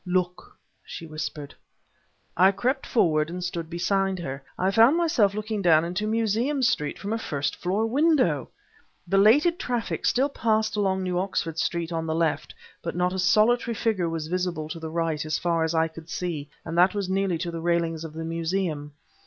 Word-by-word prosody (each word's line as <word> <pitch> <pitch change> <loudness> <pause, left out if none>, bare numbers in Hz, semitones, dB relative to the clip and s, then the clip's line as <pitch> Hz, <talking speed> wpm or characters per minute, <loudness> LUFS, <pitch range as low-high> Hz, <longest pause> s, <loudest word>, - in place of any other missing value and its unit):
"Look!" 180 -1 -2 0.3
she 165 - -8
whispered. 155 -2 -6 0.8
I 190 +2 +6
crept 260 +6 -1
forward 155 -8 +2
and 180 +1 -5
stood 170 -2 -4
beside 190 +2 0
her. 135 -5 -5 0.2
I 185 +2 +1
found 230 +9 +5
myself 235 - +2
looking 215 0 -3
down 165 -3 +4
into 185 +5 -2
Museum 230 +5 0
Street 150 -11 +1
from 205 +2 -4
a 225 - -1
first 145 -8 -2
floor 195 +5 -1
window! 255 - +2 0.6
Belated 235 - +4
traffic 245 -10 -2
still 265 +3 +3
passed 220 -5 0
along 190 -2 0
New 180 -1 -1
Oxford 165 -4 -2
Street 170 0 -1
on 165 -1 -2
the 160 - -1
left, 165 -2 -1 0.3
but 165 - -4
not 180 +1 +1
a 190 - -3
solitary 225 +5 +3
figure 205 -7 0
was 165 -2 -3
visible 175 -2 -2
to 165 - -6
the 160 0 -6
right, 160 -2 -1
as 155 0 -1
far 170 -1 0
as 160 +1 -1
I 160 0 +3
could 160 0 -12
see, 160 -5 -4 0.2
and 165 - -5
that 185 +4 +5
was 200 -2 -1
nearly 190 -2 0
to 170 +1 -4
the 165 -1 -5
railings 165 -1 0
of 160 -2 -7
the 160 +1 -5
Museum. 165 -3 -2
180 Hz, 185 wpm, -25 LUFS, 165-215 Hz, 0.8 s, I